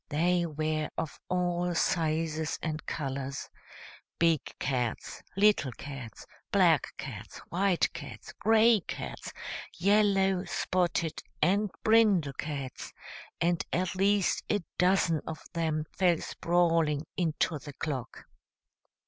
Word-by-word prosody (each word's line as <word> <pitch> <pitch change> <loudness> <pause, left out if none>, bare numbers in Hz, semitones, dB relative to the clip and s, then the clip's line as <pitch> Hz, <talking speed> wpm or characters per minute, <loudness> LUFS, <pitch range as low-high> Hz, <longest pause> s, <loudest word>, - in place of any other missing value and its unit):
They 175 +3 +2
were 155 0 -1
of 160 - -4
all 180 -1 0
sizes 160 -2 0
and 155 -1 -3
colors, 135 -2 -4 0.7
big 165 -4 +3 0.2
cats, 125 -4 -2 0.2
little 200 -9 +4
cats, 130 -3 -8 0.3
black - - +4
cats, - - -7
white 185 0 +2
cats, - - -9
gray 225 +1 +5
cats, - - -6 0.5
yellow, 195 -1 +3
spotted 175 -1 0 0.2
and 205 +3 +2
brindle 210 -10 +4
cats, 140 -2 -5 0.5
and 170 0 +1
at 180 +1 0
least 195 +1 +2
a 205 - +1 0.2
dozen 180 -4 +3
of 160 -1 -5
them 160 -2 0
fell 180 -3 +3
sprawling 165 -4 +1
into 160 -2 0
the 145 0 -9
clock. 135 -4 -5
170 Hz, 105 wpm, -30 LUFS, 155-185 Hz, 0.7 s, gray